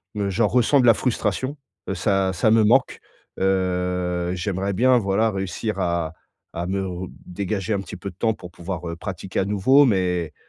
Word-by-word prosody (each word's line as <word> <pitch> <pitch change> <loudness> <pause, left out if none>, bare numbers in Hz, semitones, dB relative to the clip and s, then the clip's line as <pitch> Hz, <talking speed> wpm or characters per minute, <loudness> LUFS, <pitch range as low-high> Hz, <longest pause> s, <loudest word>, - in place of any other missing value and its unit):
m 100 -1 -1
j'en 105 +3 +2
ressens 125 +5 +3
de - - +2
la 115 - +8
frustration, 130 +3 -1 0.3
heu, - - -1
ça 95 -3 +1
ça 100 +4 +2
me 110 -1 +5
manque. 125 +5 +3 0.4
Heu, 90 -2 0
j'aimerais 95 +2 -2
bien, 125 +5 +4
voilà, 110 +1 +1
réussir 95 +2 -3
à 85 -3 -1 0.4
à 85 +1 -3
me 95 +1 -1
re 90 0 -5 0.2
dégager 100 +3 -2
un 100 - -1
petit 95 - -8
peu 100 - -6
de 85 - -24
temps, 110 +3 +1
pour 90 -4 -11
pouvoir, 85 -1 -6
heu, 85 - -4
pratiquer 95 +1 -5
à 95 - 0
nouveau, 130 +8 +4
mais 90 - 0
95 Hz, 190 wpm, -23 LUFS, 90-110 Hz, 0.4 s, la